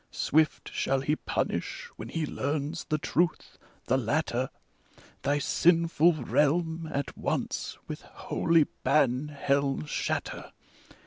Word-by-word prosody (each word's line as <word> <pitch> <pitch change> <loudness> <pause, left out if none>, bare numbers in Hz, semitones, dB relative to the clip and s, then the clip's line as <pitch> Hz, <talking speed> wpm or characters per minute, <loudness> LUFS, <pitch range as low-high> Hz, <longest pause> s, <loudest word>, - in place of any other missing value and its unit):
Swift 155 +1 +1
shall 135 -1 +1
he 150 +3 +1
punish - - -2
when 110 - -8
he 160 +3 -1
learns 145 +3 -2
the 155 - 0
truth 170 +2 -1
— - - -33
the 130 - +2
latter: 130 0 0 0.7
Thy 145 +1 +1
sinful 165 +2 +4
realm 160 +4 +1
at 140 -1 -3
once - - -2
with - - -6
holy 165 -1 +1 0.2
ban 135 0 +3
hell 140 - 0
shatter! - - -3
150 Hz, 120 wpm, -29 LUFS, 135-160 Hz, 0.7 s, sinful